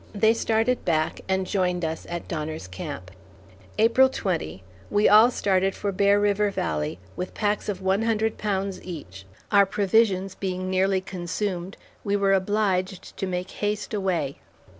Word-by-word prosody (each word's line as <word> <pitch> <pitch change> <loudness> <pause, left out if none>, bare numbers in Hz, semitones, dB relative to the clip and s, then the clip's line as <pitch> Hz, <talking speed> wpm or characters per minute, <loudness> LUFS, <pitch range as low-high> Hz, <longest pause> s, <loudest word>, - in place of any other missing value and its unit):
They 220 +2 +4
started 225 +2 +1
back 155 -2 0
and 190 0 +1
joined 180 -2 0
us 160 0 -4
at 170 0 -5
Donner's 155 - -4
Camp. 90 0 -7 0.7
April 235 +4 +5
20. 165 - -3 0.3
We 205 +1 +3
all 215 +3 +8
started 195 -5 +1
for 200 - -2
Bear 200 +1 +3
River 205 0 +2
Valley, 80 - -2 0.2
with 180 - -5
packs 210 0 -1
of 190 -2 -4
one 190 +2 +2
hundred 220 -1 0
pounds 195 -2 -2
each; 95 - -9 0.2
our 200 -2 +6
provisions 195 -1 +2
being 185 -1 -3
nearly 190 0 +2
consumed, 185 0 -4 0.3
we 200 0 0
were 200 -1 +3
obliged 190 -1 0
to 195 - -2
make 180 0 -3
haste 210 +1 -3
away. 180 -9 -1
190 Hz, 150 wpm, -25 LUFS, 180-205 Hz, 0.7 s, all